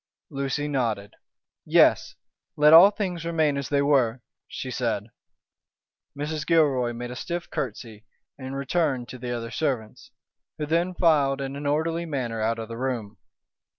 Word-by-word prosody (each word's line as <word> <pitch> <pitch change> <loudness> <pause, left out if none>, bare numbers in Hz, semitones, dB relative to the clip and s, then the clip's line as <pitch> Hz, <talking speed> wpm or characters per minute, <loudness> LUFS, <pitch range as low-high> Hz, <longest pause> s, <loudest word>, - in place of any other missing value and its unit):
Lucy 140 +1 -2
nodded. 115 -8 -2 0.5
"Yes! - - +3 0.4
let 150 +1 +6
all 175 +5 +10
things 185 -5 -4
remain 160 -3 +1
as 140 -1 -4
they 140 -1 +2
were," 130 -4 +2 0.2
she 130 - -6
said. 115 -4 -2 1.1
Mrs. 150 +1 -3
Gilroy 145 -7 +2
made 120 +1 -6
a - - -6
stiff 170 +6 -4
curtsey 110 -3 -5 0.3
and 135 0 -7
returned 140 -3 -1
to 130 - -9
the 125 0 -5
other 115 -1 -4
servants, 130 -9 -3 0.5
who 150 - -3
then 170 +4 0
filed 145 -6 +3
in 135 0 -4
an 145 0 -4
orderly 165 +3 0
manner 120 -7 -3
out 115 +1 0
of 115 -1 -6
the 115 0 -7
room. 115 -6 -3
135 Hz, 150 wpm, -25 LUFS, 120-155 Hz, 1.1 s, all